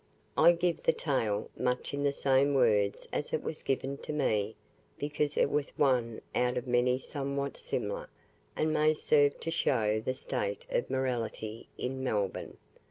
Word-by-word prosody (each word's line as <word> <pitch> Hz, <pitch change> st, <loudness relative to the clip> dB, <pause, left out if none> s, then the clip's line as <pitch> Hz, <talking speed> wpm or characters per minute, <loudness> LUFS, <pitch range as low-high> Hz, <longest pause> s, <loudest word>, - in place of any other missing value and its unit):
I 170 Hz, +2 st, +7 dB
give 170 Hz, -1 st, 0 dB
the -, -, +3 dB
tale, 110 Hz, -8 st, -1 dB
much 125 Hz, +2 st, -1 dB
in 140 Hz, -, -2 dB
the 140 Hz, 0 st, +3 dB
same 140 Hz, 0 st, +3 dB
words 105 Hz, -6 st, +2 dB
as -, -, -2 dB
it -, -, 0 dB
was -, -, -4 dB
given 135 Hz, +1 st, -1 dB
to -, -, -6 dB
me, 110 Hz, -8 st, 0 dB, 0.4 s
because 145 Hz, 0 st, -1 dB
it -, -, +4 dB
was 145 Hz, -1 st, 0 dB
one 125 Hz, -5 st, +2 dB
out 125 Hz, 0 st, +1 dB
of 125 Hz, -, -2 dB
many 125 Hz, 0 st, +3 dB
somewhat 140 Hz, 0 st, -3 dB
similar, -, -, -3 dB, 0.5 s
and 155 Hz, 0 st, +1 dB
may 155 Hz, 0 st, +4 dB
serve 145 Hz, -1 st, +3 dB
to 165 Hz, -, -2 dB
show 110 Hz, -9 st, +2 dB
the 130 Hz, -, -1 dB
state 105 Hz, -6 st, -3 dB
of -, -, 0 dB
morality 120 Hz, -4 st, -2 dB
in 130 Hz, +1 st, -3 dB
Melbourne. 100 Hz, -6 st, -2 dB
130 Hz, 165 wpm, -31 LUFS, 115-145 Hz, 0.5 s, I